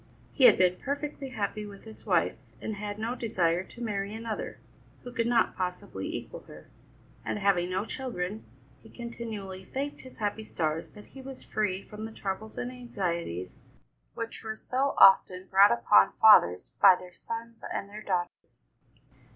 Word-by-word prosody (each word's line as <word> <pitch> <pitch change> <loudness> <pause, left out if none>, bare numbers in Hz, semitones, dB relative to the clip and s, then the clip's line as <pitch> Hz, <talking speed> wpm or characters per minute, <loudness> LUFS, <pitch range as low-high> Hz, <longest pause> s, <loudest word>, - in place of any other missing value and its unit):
He 265 - +4
had 235 - +8
been 180 -1 +3
perfectly 285 +1 -4
happy 215 -3 -3
with 200 -1 -10
his 220 -1 -13
wife, - - +2 0.2
and 220 - -4
had 205 0 -5
no 225 +3 -2
desire 185 -8 0
to 240 - -10
marry 205 -1 -2
another, 225 -1 -5 0.4
who 245 - -8
could 235 -2 0
not 235 -2 +2
possibly 180 -1 -4
equal - - -6
her; - - -14 0.5
and, - - -2
having 195 -3 +2
no 190 +3 -1
children, 220 -6 -4 0.4
he - - -16
continually 220 -5 -7
thanked 275 +8 -4
his 260 - -13
happy 210 0 -2
stars 160 -5 -2
that 210 -1 -12
he 270 - -11
was 265 0 -9
free 200 -3 -1
from 210 +1 -8
the 225 - -7
troubles 215 +1 -5
and 245 0 -3
anxieties 170 - -4 0.6
which 230 0 -5
were 220 -1 -4
so 265 +5 -1
often 190 -1 +6
brought 195 +1 +7
upon 115 -4 +5
fathers 90 - +6
by 185 - +9
their 180 0 -11
sons 230 +3 -7
and 200 - -3
their 210 +1 -9
daughters. 180 -4 -4
210 Hz, 165 wpm, -29 LUFS, 185-235 Hz, 0.6 s, by